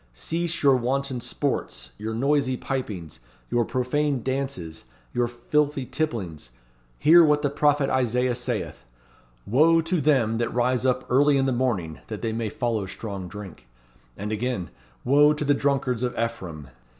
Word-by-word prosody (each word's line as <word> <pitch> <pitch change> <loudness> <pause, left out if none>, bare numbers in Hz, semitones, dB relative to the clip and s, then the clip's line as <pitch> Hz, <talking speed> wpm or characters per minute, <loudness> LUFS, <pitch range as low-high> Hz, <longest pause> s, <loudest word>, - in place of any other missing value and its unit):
Cease 165 - -2
your 135 -2 +6
wanton 130 +1 -1
sports, 120 - -3
your 110 +1 -4
noisy 135 +1 +1
pipings, 105 - -5 0.3
your 120 - +3
profane 130 +2 -1
dances, 130 - -4 0.3
your 120 0 +1
filthy 140 +3 0
tipplings. 95 - -3 0.5
Hear 170 - +7
what 150 -1 +3
the 145 - +1
prophet 145 -1 +2
Isaiah 125 -1 +1
saith: 120 - -3 0.6
'Wo 155 +10 +4
to 165 0 -1
them 125 -6 +2
that 120 - -1
rise 125 +1 +1
up 130 0 0
early 140 +2 +4
in 135 - +2
the 135 - +1
morning, 110 -11 -1
that 110 0 -6
they 115 -1 -1
may 115 -1 -2
follow 110 -3 -2
strong 95 -2 -6
drink.' 95 -8 -10 0.5
And 105 +2 -4
again: 110 - -2 0.3
'Wo 145 +3 +5
to 150 0 -3
the 145 - +4
drunkards 135 -4 0
of 125 -1 -2
Ephraim.' 90 - -4
125 Hz, 150 wpm, -25 LUFS, 110-140 Hz, 0.6 s, Hear